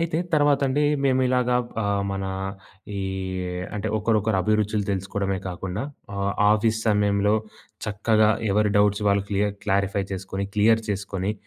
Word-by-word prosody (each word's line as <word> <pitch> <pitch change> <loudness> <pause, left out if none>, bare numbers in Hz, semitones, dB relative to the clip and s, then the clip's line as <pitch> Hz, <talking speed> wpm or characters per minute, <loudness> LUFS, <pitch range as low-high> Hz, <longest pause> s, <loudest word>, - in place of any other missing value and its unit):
అయితే, 165 -1 0 0.2
తర్వాతండి 145 -1 +3 0.2
మేమిలాగా 125 -2 +2 0.3
ఆహ్, 100 -1 0
మన 95 0 -3 0.7
ఈ - - -2 0.8
అంటే, 105 +1 -2
ఒకరొకరు 110 -1 +1
అభిరుచులు 105 0 +1
తెలుసుకోవడమే 95 0 -2
కాకుండా, 90 +3 -4 0.3
ఆహ్, 100 0 0 0.2
ఆఫీస్ 110 +1 +1
సమయంలో 105 0 +2 0.5
చక్కగా 110 +1 +3 0.2
ఎవరు 105 +1 +2
డౌట్స్ 105 0 +3
వాళ్ళు 100 0 +2
క్లియ 100 +1 +2 0.2
క్లారిఫై 100 0 +1
చేసుకొని, 95 +1 -4
క్లియర్ 110 +2 +4
చేసుకొని 100 -1 -2
105 Hz, 120 wpm, -24 LUFS, 100-110 Hz, 0.8 s, క్లియర్